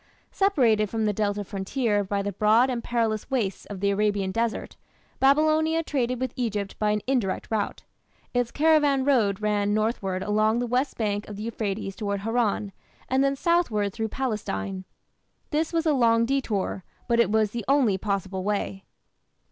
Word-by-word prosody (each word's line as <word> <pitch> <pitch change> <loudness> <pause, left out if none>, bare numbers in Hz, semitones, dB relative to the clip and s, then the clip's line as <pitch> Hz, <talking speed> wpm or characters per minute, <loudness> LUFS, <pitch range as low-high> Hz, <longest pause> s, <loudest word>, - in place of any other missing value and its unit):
Separated 240 - +2
from 220 0 -1
the 210 - +1
Delta 205 0 -1
frontier 205 +2 -1
by 200 +1 -2
the 205 - -2
broad 220 +6 +3
and 235 -2 -3
perilous 225 -3 -1
wastes 225 -8 -2
of 200 -2 -7
the 200 0 +2
Arabian 200 -1 0
desert, 230 +2 -2 0.4
Babylonia 310 +4 +3
traded 255 -5 -1
with 260 -2 -2
Egypt 210 -5 -3
by 210 - +1
an 210 0 +1
indirect 245 -8 -1
route. 215 -2 -2 0.5
Its 245 -1 +1
caravan 290 -2 +3
road 215 -8 +2
ran 205 -1 +1
northward 205 -4 -1
along 215 +2 +2
the 245 - 0
west 255 +3 -1
bank 205 -2 -1
of 210 - -6
the 210 - -6
Euphrates 210 -3 -3
towards 200 -2 -3
Haran, 225 -3 0 0.4
and 265 +1 +3
then 275 0 +2
southward 265 - +1
through 225 0 -2
Palestine. 195 - -3 0.7
This 315 +1 0
was 330 -1 0
a 310 - +3
long 230 -3 +3
detour, 230 -8 -1 0.2
but 235 -1 +2
it 235 -5 +4
was 215 -1 +2
the 235 -1 -4
only 255 -9 +3
possible 195 -2 -2
way. 200 -1 -2
220 Hz, 165 wpm, -26 LUFS, 205-255 Hz, 0.7 s, it